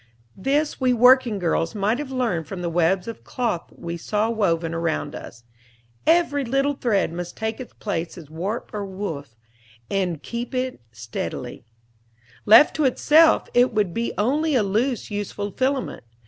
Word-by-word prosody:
This 285 +9 0
we 255 -1 +3
working 250 -2 +5
girls 165 0 0
might 210 +5 0
have 295 -2 -5
learned 230 - -1
from 185 -3 -6
the 170 - -2
webs 175 +3 +1
of 230 - -7
cloth 230 -9 -2
we 170 0 -6
saw 210 +6 -1
woven 170 -7 0
around 165 -1 -2
us. 115 0 -10 0.6
Every 320 -4 +3
little 275 +3 +1
thread 215 - 0
must 175 0 -6
take 220 0 -3
its 255 - -9
place 170 -4 -4
as 165 -4 -10
warp 180 +9 -4
or 210 -1 -3
woof, 185 - -6 0.6
and 180 -6 -1
keep 240 +2 -5
in 255 0 -1
it - - -22
steadily. 110 0 -6 0.8
Left 225 +8 +8
to 305 - +2
itself, 310 +5 +4
it 245 0 +4
would 205 -5 +1
be 230 +4 -1
only 290 +8 +1
a 235 - +3
loose, 220 +5 -1
useless 205 0 -4
filament. 260 0 -1
210 Hz, 160 wpm, -23 LUFS, 175-255 Hz, 0.8 s, Left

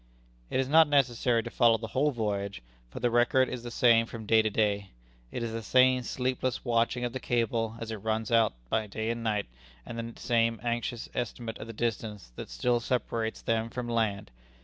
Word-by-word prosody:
It - - 0
is 130 - +1
not 160 +3 +6
necessary 125 -4 +2
to 120 - -7
follow 115 -2 +4
the 110 0 -7
whole 140 +7 +2
voyage, 100 - -3 0.3
for - - -8
the 120 0 +1
record 120 +2 +4
is 125 - -5
the 120 - -6
same 115 -1 +4
from 115 -2 -8
day 110 +1 +5
to 110 - 0
day. 100 -2 0 0.4
It 120 - -3
is 115 - -3
the 115 0 -4
same 130 +3 +4
sleepless 125 +1 -2
watching 120 +1 +1
of 120 - -4
the 130 - -3
cable 115 -2 0
as 115 -1 -5
it 110 - -3
runs 110 +2 -2
out 115 -2 +4 0.4
day 110 +2 -2
and 115 0 -4
night, 105 -2 0 0.4
and 115 - -6 0.2
the - - -15
same 115 -1 +1
anxious 120 0 -2
estimate 115 -1 -4
of 110 - -7
the - - -6
distance 105 - -3
that - - -7
still 120 -1 +1
separates 115 -2 -2
them 115 0 0
from 125 +1 -5
land. 110 - -1
115 Hz, 200 wpm, -29 LUFS, 110-120 Hz, 0.4 s, not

